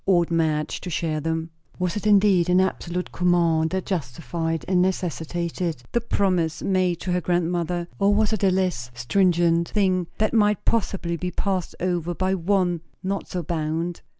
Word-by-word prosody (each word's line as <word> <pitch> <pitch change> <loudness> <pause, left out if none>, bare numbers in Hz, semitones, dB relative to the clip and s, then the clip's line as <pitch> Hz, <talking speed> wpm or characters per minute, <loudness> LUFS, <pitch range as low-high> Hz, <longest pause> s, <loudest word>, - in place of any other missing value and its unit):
Ought 175 -3 +3
Madge 155 -2 0
to 180 - -5
share 155 -2 -1
them? 160 +1 -2 0.3
Was 180 -2 -1
it 210 0 -2
indeed 195 -4 +4
an 180 +1 +5
absolute 180 -1 -1
command 170 -3 +2
that 190 +1 -2
justified 165 0 -3
and 185 -1 +3
necessitated 170 -4 -2
the 235 - +1
promise 185 -7 0
made 185 -3 +1
to 185 - -2
her 180 0 +1
grandmother? 175 0 -1
or 200 0 +4
was 215 +1 +2
it 210 - -2
a 195 - +5
less 180 -10 0
stringent 170 +5 +2
thing, 185 -4 +1
that 215 0 +1
might 210 -3 +2
possibly 190 -6 0
be 180 +2 -3
passed 185 0 -2
over 175 -1 -1
by 185 +2 0
one 180 -2 +1 0.2
not 195 +1 -2
so 180 -1 -3
bound? 165 +2 -2
175 Hz, 165 wpm, -24 LUFS, 165-190 Hz, 0.3 s, an